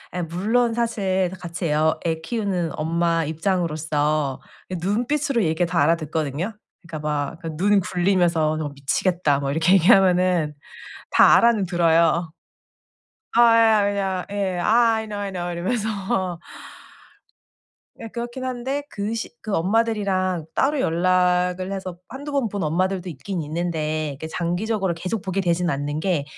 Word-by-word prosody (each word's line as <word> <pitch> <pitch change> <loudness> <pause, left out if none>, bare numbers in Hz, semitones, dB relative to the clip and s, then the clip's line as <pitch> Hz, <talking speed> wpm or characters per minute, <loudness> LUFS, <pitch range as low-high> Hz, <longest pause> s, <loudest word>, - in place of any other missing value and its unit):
예 180 - -1
물론 220 +8 0
사실 195 -6 0
다 185 - -8
같이 175 0 -5
애 150 - 0
어 155 +1 +2
애 160 -1 -1
키우는 190 -5 -2
엄마 165 +1 +1
입장으로서 155 -4 -1 0.3
이 185 - -3
눈빛으로 245 - 0
얘기 160 +2 +1
다 170 - 0
알아듣거든요? 160 +3 -1 0.3
그러니까 170 -2 -8
막 150 +2 -2
그 160 -2 -5
눈 200 +4 +3
굴리면서 175 -4 +1
"너 155 -2 -3
미치겠다." 145 +2 0
뭐 140 -1 -2
이렇게 165 +5 +3
얘기하면은 180 -4 +4 0.6
다 - - +7
알아는 230 -4 +3
들어요. 170 -1 +2 1.0
아 240 - +6 0.2
예 225 -1 +5
아 210 - +3
그냥 195 -2 -1
예, 195 -3 -1
"아 230 +4 +4
I 220 0 -3
know, 205 -1 -5
I 200 -1 -3
know." 175 -1 -4
이러면서. 190 -2 -2 1.6
예 225 - -6
그렇긴 240 +3 -6
한데 260 +3 -3
그 205 +1 -3
시 230 - -4
그 215 -3 -3
엄마들이랑 190 -3 0
따로 285 +1 +1
연락을 180 +1 +1
해서 185 -3 -5
한두 285 +4 -7
번 275 -5 +1
본 200 -1 -4
엄마들도 185 +4 0
있긴 165 +5 -5
있는데 155 -2 -2
그 160 - -5
장기적으로 185 +3 -1
계속 185 +5 -3
보게 190 +1 -2
되진 175 0 +1
않는 145 +1 -2
게 170 -5 0
180 Hz, 310 characters per minute, -23 LUFS, 165-205 Hz, 1.6 s, 다